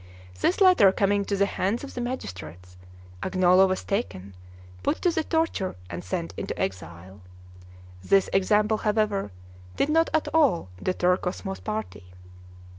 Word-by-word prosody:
This 360 Hz, -, +1 dB
letter 365 Hz, -, +6 dB
coming 200 Hz, +1 st, +1 dB
to 200 Hz, -, -1 dB
the 200 Hz, -, +3 dB
hands 200 Hz, +5 st, -2 dB
of 280 Hz, -, -8 dB
the 245 Hz, -, -4 dB
magistrates, 90 Hz, -, -7 dB, 0.5 s
Agnolo 185 Hz, 0 st, +4 dB
was 185 Hz, 0 st, -2 dB
taken, 100 Hz, -, -3 dB, 0.5 s
put -, -, -1 dB
to 355 Hz, -, +3 dB
the 320 Hz, -1 st, -1 dB
torture, 320 Hz, -, -1 dB, 0.2 s
and 85 Hz, 0 st, -6 dB
sent 85 Hz, -2 st, -4 dB
into -, -, -5 dB
exile. 95 Hz, +1 st, -5 dB, 0.8 s
This 195 Hz, -, +3 dB
example, 210 Hz, +3 st, +2 dB
however, 210 Hz, -, 0 dB, 0.4 s
did 285 Hz, -, 0 dB
not 325 Hz, +2 st, +3 dB
at 315 Hz, -, +1 dB
all 275 Hz, -, +3 dB
deter 180 Hz, 0 st, +1 dB
Cosmo's 190 Hz, +1 st, -5 dB
party. 215 Hz, -, -5 dB
195 Hz, 140 wpm, -25 LUFS, -, 0.8 s, letter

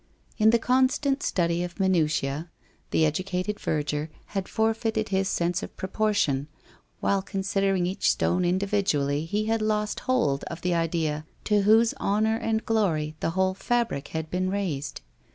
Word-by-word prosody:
In 215 Hz, +1 st, +6 dB
the 235 Hz, -, +5 dB
constant 265 Hz, +4 st, +2 dB
study 170 Hz, -1 st, 0 dB
of 180 Hz, +2 st, -7 dB
minutiae 155 Hz, -4 st, +1 dB, 0.4 s
the 160 Hz, -, +3 dB
educated 185 Hz, +5 st, -2 dB
verger 150 Hz, 0 st, -1 dB, 0.2 s
had 195 Hz, -2 st, -2 dB
forfeited 220 Hz, -1 st, 0 dB
his 195 Hz, 0 st, +1 dB
sense 175 Hz, 0 st, 0 dB
of -, -, -8 dB
proportion; 190 Hz, -9 st, 0 dB, 0.5 s
while 200 Hz, -1 st, +2 dB
considering 195 Hz, -1 st, 0 dB
each 185 Hz, +2 st, +1 dB
stone 180 Hz, +1 st, +1 dB
individually, 175 Hz, -6 st, +1 dB
he 210 Hz, +6 st, -1 dB
had 225 Hz, 0 st, 0 dB
lost 210 Hz, -1 st, 0 dB
hold 145 Hz, -, +2 dB
of 165 Hz, -, -7 dB
the 180 Hz, 0 st, 0 dB
idea 160 Hz, -2 st, -1 dB, 0.2 s
to 210 Hz, -1 st, +2 dB
whose 220 Hz, +3 st, +5 dB
honour 220 Hz, +2 st, +1 dB
and 225 Hz, -1 st, -1 dB
glory 165 Hz, -9 st, 0 dB
the -, -, 0 dB
whole 190 Hz, 0 st, +2 dB
fabric 225 Hz, -, -1 dB
had 160 Hz, -1 st, -5 dB
been 185 Hz, +1 st, 0 dB
raised. 180 Hz, -8 st, -3 dB
190 Hz, 150 wpm, -26 LUFS, 160-215 Hz, 0.5 s, In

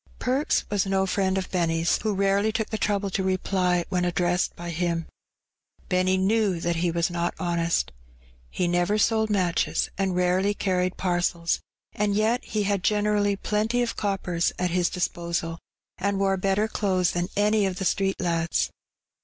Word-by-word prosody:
Perks 265 Hz, +4 st, 0 dB
was 200 Hz, -2 st, +1 dB
no 190 Hz, 0 st, +2 dB
friend 190 Hz, 0 st, 0 dB
of 190 Hz, -, -3 dB
Benny's, 165 Hz, -2 st, +1 dB
who 215 Hz, -2 st, -1 dB
rarely 200 Hz, +2 st, +2 dB
took 220 Hz, 0 st, -2 dB
the 220 Hz, -, -1 dB
trouble 200 Hz, -1 st, 0 dB
to 190 Hz, -, 0 dB
reply 185 Hz, -2 st, +1 dB
when 180 Hz, -1 st, 0 dB
addressed 175 Hz, 0 st, 0 dB
by 175 Hz, 0 st, -6 dB
him. 170 Hz, 0 st, -1 dB, 0.8 s
Benny 185 Hz, 0 st, +2 dB
knew 195 Hz, -1 st, +2 dB
that 170 Hz, 0 st, -1 dB
he 175 Hz, +1 st, +1 dB
was 170 Hz, +1 st, 0 dB
not 170 Hz, 0 st, -1 dB
honest. 170 Hz, -, 0 dB, 0.6 s
He 180 Hz, -, -1 dB
never 175 Hz, +4 st, +1 dB
sold 220 Hz, 0 st, +2 dB
matches, 185 Hz, -5 st, 0 dB
and 190 Hz, -2 st, 0 dB
rarely 185 Hz, +3 st, +2 dB
carried 185 Hz, -2 st, 0 dB
parcels, 175 Hz, -2 st, 0 dB, 0.3 s
and 205 Hz, -1 st, 0 dB
yet 225 Hz, +4 st, +1 dB
he 210 Hz, -1 st, -2 dB
had 200 Hz, -1 st, 0 dB
generally 210 Hz, -1 st, +2 dB
plenty 220 Hz, +4 st, 0 dB
of 235 Hz, -, -3 dB
coppers 190 Hz, -4 st, 0 dB
at 180 Hz, -1 st, -1 dB
his 180 Hz, 0 st, +2 dB
disposal, 170 Hz, -2 st, -2 dB, 0.4 s
and 200 Hz, +1 st, 0 dB
wore 195 Hz, 0 st, +2 dB
better 195 Hz, +3 st, +1 dB
clothes 185 Hz, -5 st, +1 dB
than 175 Hz, 0 st, -2 dB
any 210 Hz, 0 st, +3 dB
of 185 Hz, -, -3 dB
the 190 Hz, -, -3 dB
street 195 Hz, +1 st, 0 dB
lads. 170 Hz, -2 st, 0 dB
190 Hz, 165 wpm, -25 LUFS, 175-205 Hz, 0.8 s, any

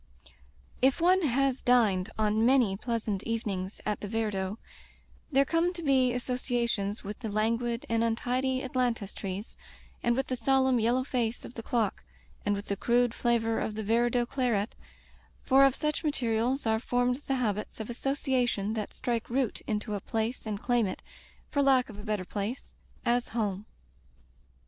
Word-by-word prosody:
If 265 Hz, 0 st, +4 dB
one 365 Hz, +3 st, +4 dB
has 275 Hz, -3 st, +1 dB
dined 220 Hz, -6 st, +3 dB
on 215 Hz, 0 st, +2 dB
many 240 Hz, -5 st, +4 dB
pleasant 220 Hz, -2 st, -2 dB
even 230 Hz, -2 st, -2 dB
ings 185 Hz, +1 st, -4 dB
at 210 Hz, -1 st, -1 dB
the 205 Hz, -, -5 dB
Viardot, 210 Hz, -2 st, -2 dB, 0.7 s
there 275 Hz, 0 st, +4 dB
come 335 Hz, +3 st, +2 dB
to 345 Hz, -1 st, -7 dB
be 260 Hz, -3 st, +4 dB
asso 250 Hz, +1 st, -2 dB
ciations 235 Hz, -5 st, -1 dB
with 205 Hz, +1 st, -6 dB
the 225 Hz, -, -4 dB
languid 230 Hz, +3 st, 0 dB
and 230 Hz, 0 st, +1 dB
untidy 255 Hz, +3 st, 0 dB
ailantus 245 Hz, -5 st, -1 dB
trees, 195 Hz, +2 st, -6 dB, 0.4 s
and 240 Hz, 0 st, +2 dB
with 265 Hz, +1 st, 0 dB
the 255 Hz, -, -2 dB
solemn 265 Hz, -1 st, +3 dB
yellow 240 Hz, +3 st, +2 dB
face 245 Hz, -3 st, -2 dB
of -, -, -10 dB
the 230 Hz, -, -6 dB
clock, 225 Hz, -3 st, -1 dB, 0.4 s
and 205 Hz, 0 st, +1 dB
with 200 Hz, +1 st, -5 dB
the 200 Hz, -, -2 dB
crude 240 Hz, +2 st, +2 dB
flavor 230 Hz, -2 st, +1 dB
of 215 Hz, -, -2 dB
the 220 Hz, -, -3 dB
Viar 230 Hz, +3 st, +3 dB
dot 240 Hz, 0 st, +1 dB
claret, 235 Hz, -6 st, 0 dB, 0.7 s
for 270 Hz, +1 st, +6 dB
of 270 Hz, -1 st, +3 dB
such 300 Hz, +2 st, -1 dB
materials 250 Hz, -2 st, 0 dB
are 220 Hz, 0 st, +2 dB
formed 245 Hz, +1 st, +1 dB
the 270 Hz, -, +1 dB
habits 215 Hz, -5 st, -2 dB
of 220 Hz, -, -4 dB
association 245 Hz, -5 st, 0 dB
that 215 Hz, -2 st, -4 dB
strike 235 Hz, -3 st, -2 dB
root 250 Hz, -2 st, 0 dB
into 210 Hz, 0 st, -2 dB
a 200 Hz, -, -2 dB
place 225 Hz, +1 st, -2 dB
and 210 Hz, -1 st, -4 dB
claim 240 Hz, -4 st, +2 dB
it -, -, -6 dB, 0.2 s
— -, -, -29 dB
for 285 Hz, -, +2 dB
lack 265 Hz, -3 st, +4 dB
of 210 Hz, -2 st, -10 dB
a -, -, -8 dB
better 210 Hz, -4 st, -2 dB
place 210 Hz, +7 st, -4 dB, 0.2 s
— -, -, -30 dB
as 245 Hz, -, -1 dB
home. 205 Hz, -1 st, -1 dB
235 Hz, 180 wpm, -29 LUFS, 215-255 Hz, 0.7 s, for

